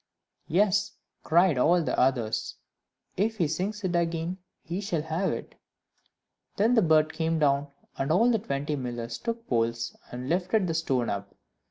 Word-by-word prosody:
"Yes," 200 +3 +2 0.3
cried 170 -3 +4
all 170 +5 +4
the - - -1
others, 115 -4 0 0.6
"if 220 +4 0
he 170 -6 +2
sings 195 +7 -3
it 180 -2 0
again, 170 +1 -1 0.2
he 175 +4 -4
shall 175 -7 -2
have 160 +5 -1
it." - - -6 1.0
Then 220 +5 +3
the 230 - +5
bird 155 -3 +3
came 160 0 0
down, 145 -1 +2 0.3
and 135 +3 0
all 230 +9 +4
the 225 - +2
twenty 145 -3 -2
millers 120 -3 -4
took 230 -1 -4
poles, 115 -1 0 0.2
and 125 +1 -6
lifted 185 +5 +1
the 165 - -1
stone 135 -7 0
up. 100 0 -5
165 Hz, 160 wpm, -27 LUFS, 135-190 Hz, 1.0 s, the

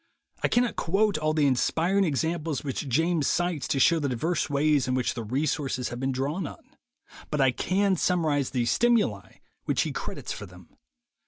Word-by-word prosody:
I - - +3
cannot 245 0 +1
quote 195 0 +1
all 155 0 +1
the 150 -2 +3
inspiring 165 +9 +2
examples 160 -1 -1
which 140 0 -4
James 160 +3 +1
cites 175 -5 0
to 135 - 0
show 165 +5 +4
the 145 -2 -1
diverse 160 +8 -1
ways 145 -1 +2
in 130 - 0
which 130 -2 0
the 115 - -5
resources 130 +1 -1
have 120 - -6
been 135 +1 -1
drawn 145 +7 -2
on, - - -13 0.5
but 150 - -2
I 135 -2 +4
can 190 +8 +1
summarize 155 -6 +1
the 125 -3 -1
"stimuli" 235 - +1 0.3
which - - +1
he - - -3
credits - - -5
for - - -6
them. - - -17
150 Hz, 180 wpm, -27 LUFS, 135-175 Hz, 0.5 s, show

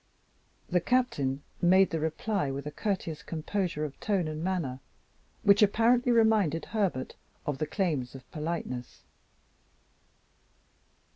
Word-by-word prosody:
The 180 -1 +2
Captain 145 - +1 0.2
made 190 +2 +5
the 165 - -1
reply 160 +2 -1
with 140 +1 -4
a 150 - -4
courteous 170 -3 -3
composure 165 -1 -2
of 140 - -8
tone 195 -6 0
and 155 +1 -4
manner 170 -9 -1 0.6
which 200 +1 +6
apparently 235 +4 +4
reminded 215 -9 +3
Herbert 195 - -1 0.3
of 145 -2 -2
the 155 - -1
claims 150 -8 -1
of 130 -1 -11
politeness. 150 -6 -4
170 Hz, 120 wpm, -29 LUFS, 150-205 Hz, 0.6 s, which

